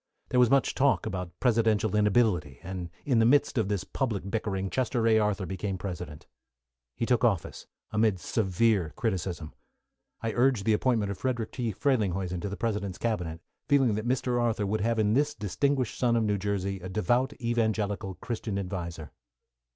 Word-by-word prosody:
There 125 - +2
was 125 -2 +6
much 135 +1 +3
talk 140 0 +2
about 90 -2 -5
presidential 110 -3 +2
inability, 105 - +2
and 90 -1 -5 0.2
in 125 -5 +3
the 115 - +5
midst 145 +3 +3
of 110 - +1
this 100 -3 -1
public 105 -7 -3
bickering 95 -4 -2
Chester 120 -2 0
A. 110 -1 +5
Arthur 105 -2 0
became 95 +1 -3
president. 90 -5 -6 0.7
He - - -1
took 125 -1 +2
office, 100 -9 0 0.2
amid 105 -3 +2
severe 95 -3 +1
criticism. 90 -7 -3 0.7
I 115 - -2
urged 120 -4 +2
the 110 - +4
appointment 110 -3 +1
of 100 - -6
Frederick 120 -4 -2
T. 120 -3 -2
Frelinghuysen 95 -7 0
to 100 - -3
the 100 - -5
President's 105 -5 -2
Cabinet, 90 -8 -2 0.3
feeling 135 -6 +4
that. 110 +3 -2
Mr. 125 -1 +1
Arthur 115 -3 0
would 105 +2 -1
have 115 +2 +1
in 105 -1 +2
this 145 +3 +2
distinguished 125 +5 0
son 120 -2 +3
of 115 - +2
New 105 -2 0
Jersey, 100 -1 -2
a 95 +1 -7
devout, 120 +7 +1
evangelical, 110 -5 -1
Christian 110 -3 -4
adviser. 85 -5 -5
105 Hz, 170 wpm, -28 LUFS, 95-120 Hz, 0.7 s, was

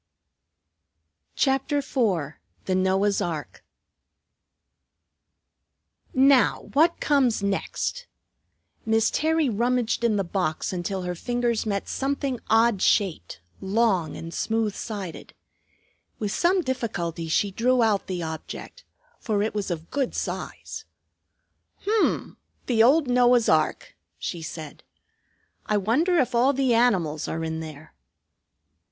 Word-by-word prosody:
CHAPTER 270 +2 +1
IV 205 - 0 0.3
THE 190 - 0
NOAH'S 190 +2 +2
ARK 160 -4 -4 2.5
"Now, 265 0 +5
what 325 +4 +3
comes 260 -8 +2
next?" 345 - -2 0.8
Miss 225 0 +2
Terry 320 0 +1
rummaged 235 +1 0
in 230 -2 +3
the 200 - +1
box 180 -2 -2
until 185 +1 -3
her 180 0 -2
fingers 240 +3 -1
met 200 -2 -2
something 270 -2 -2
odd 225 -3 +4
shaped, 175 - +1 0.2
long, 195 -3 +1
and 165 +1 -7
smooth 225 -2 0
sided. 200 -7 -7 0.8
With 210 -2 -3
some 360 - +2
difficulty 175 - -3
she 195 +5 +1
drew 245 +4 +2
out 210 -3 +1
the 180 -3 -3
object, 160 - -7 0.4
for 205 -2 0
it 220 - -2
was 205 -2 -3
of 165 -2 -5
good 275 -3 -1
size. - - -5 1.0
"H'm! 430 +1 0 0.3
The 230 -3 +2
old 280 +5 +5
Noah's 245 -1 +4
ark," 155 -1 +1 0.2
she 170 - -5
said. 155 -2 -8 0.9
"I 210 - +2
wonder 300 - +2
if 260 -4 +1
all 250 +4 +4
the 265 -2 +2
animals 185 -11 +2
are 165 0 -3
in 160 0 -3
there." 155 -1 -9
220 Hz, 115 wpm, -25 LUFS, 185-255 Hz, 2.5 s, Now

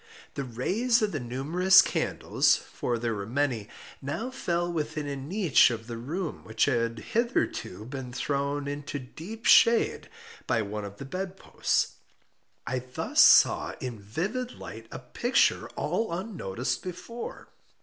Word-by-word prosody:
The 140 - -3
rays 210 - +1
of 210 - +1
the 155 - -2
numerous 155 +10 +4
candles - - +2
(for 120 -1 -3
there 115 0 -1
were 100 -1 -5
many) 125 -4 -1 0.3
now 220 - -3
fell 175 -8 -1
within 155 -1 -2
a 140 -1 -3
niche 155 +3 +3
of 115 -2 -5
the 120 0 -6
room 155 +8 -4
which 110 0 +1
had 115 -4 0 0.2
hitherto 215 - -1
been 130 0 -6
thrown 140 +2 -2
into 145 0 -4
deep 170 - -9
shade 235 - +5 0.4
by 115 -2 +2
one 105 0 -5
of 100 0 -9
the 140 - -7
bed 185 +6 -5
posts. - - -1 0.7
I 130 0 -1
thus 125 0 +1
saw - - +6
in 120 -4 -5
vivid 195 - -3
light 115 +1 -9
a - - -5
picture 240 - +1
all 225 -5 -1
unnoticed 170 - -3
before. 185 +7 -7
145 Hz, 145 wpm, -28 LUFS, 120-190 Hz, 0.7 s, saw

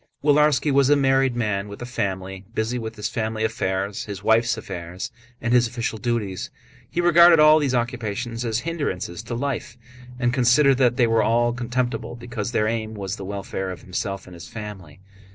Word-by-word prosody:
Willarski 150 0 +4
was 140 0 +4
a 145 - +6
married 135 -2 +2
man 105 -4 -1
with 100 0 -9
a 120 - -5
family, 95 -5 -3
busy 115 +2 -1
with 110 -1 -6
his 105 - -3
family 110 -1 -2
affairs, 100 -2 -2
his 100 -2 -7
wife's 115 +1 +3
affairs, 90 -3 -6 0.3
and 120 +1 -1
his 120 -1 +5
official 115 -1 -3
duties. 110 -6 -2 0.4
He - - -3
regarded 175 -1 +7
all 155 +1 +7
these 135 -4 0
occupations 120 -1 -2
as 115 -1 -1
hindrances 140 - -3
to 120 - -5
life, 125 -2 -3 0.4
and 120 -1 +1
considered 130 +2 +4
that 125 -2 +3
they 125 - +5
were 115 -1 +3
all 120 +1 +2
contemptible 120 -1 -2
because 120 -2 -5
their 110 -3 +1
aim 110 -1 -2
was 100 0 -4
the 95 - -7
welfare 95 -1 -4
of 90 - -8
himself 95 +1 -4
and 90 - -12
his 85 -1 -10
family. 95 -5 -9
115 Hz, 185 wpm, -23 LUFS, 100-125 Hz, 0.4 s, regarded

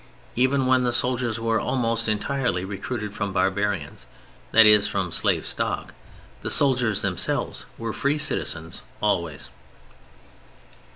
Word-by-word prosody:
Even 130 +2 +2
when 130 0 +3
the 120 - +1
soldiers 120 -2 0
were 115 0 0
almost 115 -3 -1
entirely 110 -3 -1
recruited 105 +2 -5
from 100 -1 -3
barbarians, 95 -9 -1 0.4
that 115 0 +7
is, 105 -1 +7
from 95 -3 -2
slave - - +1
stock, - - -3 0.5
the - - -3
soldiers 120 -7 +2
themselves 90 -3 -2
were 115 -1 -4
free 140 +2 0
citizens 80 - -2 0.2
always. 85 -8 -2
110 Hz, 120 wpm, -24 LUFS, 100-125 Hz, 0.5 s, that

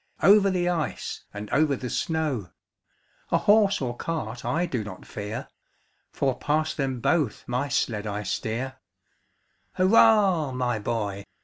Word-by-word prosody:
Over 200 +3 +7
the 180 -2 0
ice, 170 -4 -3
and 105 +1 -7
over 150 -1 +3
the 125 - -5
snow; 155 - -1 0.8
A - - +3
horse 205 -3 +4
or 120 -2 -2
cart 120 -7 -4
I 170 +3 0
do 125 -10 -2
not 100 -3 -9
fear. 105 +1 -6 0.6
For 135 -2 0
past 155 +1 0
them 135 -3 -2
both 150 -5 +1
my 125 +4 -1
sled 110 -5 -1
I 105 0 -3
steer. 115 +6 -3 1.0
Hurra! 190 - +4
my 120 -3 0
boy! 105 -3 -3
135 Hz, 135 wpm, -26 LUFS, 110-165 Hz, 1.0 s, Over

